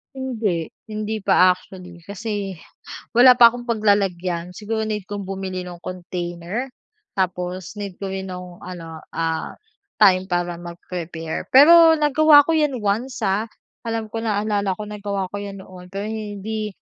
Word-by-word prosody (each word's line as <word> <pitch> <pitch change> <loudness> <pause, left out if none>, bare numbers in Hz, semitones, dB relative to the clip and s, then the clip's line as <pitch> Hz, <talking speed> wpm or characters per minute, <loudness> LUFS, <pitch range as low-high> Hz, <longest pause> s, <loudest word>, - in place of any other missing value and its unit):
Hindi. 220 -11 -2 0.2
Hindi 215 0 -3
pa 185 - +6
actually 180 -1 -12
kasi 205 -1 -4 0.6
wala 250 +1 +9
pa 240 -1 +8
akong 240 +1 -8
paglalagyan. 190 -6 0
Siguro 220 +3 -3
need 210 -3 -4
kong 205 -1 -4
bumili 190 -1 -4
ng 175 -1 -9
container. 180 +5 -5 0.5
Tapos 180 -1 -2
need 200 -3 -6
ko 195 - -5
rin 190 0 -5
nung 180 -1 -8
ano, 165 -3 -8
ah, 165 -1 -3 0.4
time 190 -2 +5
para 175 -1 0
mag-prepare. 170 -2 -6
Pero 325 +4 +8
nagawa 295 0 +6
ko 330 - +1
'yan 300 -4 +1
once, 225 +4 -2
ah, 205 +4 0 0.4
alam 225 -1 -2
ko 225 +1 -4
naalala 205 -3 0
ko 210 - -5
nagawa 205 -2 -3
ko 205 - -3
'yan 200 -1 -7
noon. 180 -1 -13
Pero 195 +2 -4
hindi 215 0 -4
200 Hz, 145 wpm, -22 LUFS, 180-220 Hz, 0.6 s, wala